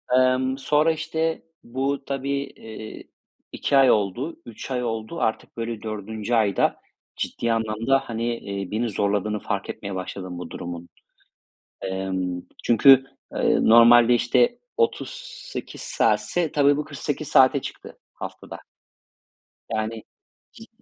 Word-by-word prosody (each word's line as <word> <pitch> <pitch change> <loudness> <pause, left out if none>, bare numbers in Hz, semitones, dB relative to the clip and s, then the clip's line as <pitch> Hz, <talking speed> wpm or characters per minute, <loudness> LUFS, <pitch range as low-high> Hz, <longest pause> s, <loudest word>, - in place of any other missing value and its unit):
Emm, 130 +1 +3
sonra, 150 +3 +3
işte, 160 +1 -2 0.2
bu 135 +3 -2
tabii, 140 0 -2
eee, 110 -4 -10 0.5
2 140 - +1
ay 135 -2 +7
oldu, 110 - -1
3 120 +3 -9
ay 125 -1 -1
oldu. 115 +7 -4
Artık 110 - -2
böyle, 115 -2 -4
4'üncü 110 +1 -4
ayda 105 -4 +2 0.4
ciddi 115 - -2
anlamda, 115 +4 +1
hani, 115 0 -2
eee, 100 -2 -5
beni 115 +2 0
zorladığını 105 +1 0
fark 100 0 -3
etmeye 100 -1 -5
başladım 95 -1 -6
bu 90 -2 -7
durumun. 85 0 -7 0.9
Emm, 95 -2 -3 0.2
çünkü, 130 +3 +7 0.3
eee, - - +2
normalde, 120 +1 +7
işte, 120 - +2 0.2
38 - - -3
saatse, 175 - +1
tabii 145 -1 +4
bu 150 - -2
48 145 0 -4
saate 135 0 +5
çıktı - - -9 0.2
haftada. - - -8 1.1
Yani, 110 0 -3 0.5
cid - - -13
120 Hz, 120 wpm, -24 LUFS, 105-140 Hz, 1.1 s, ay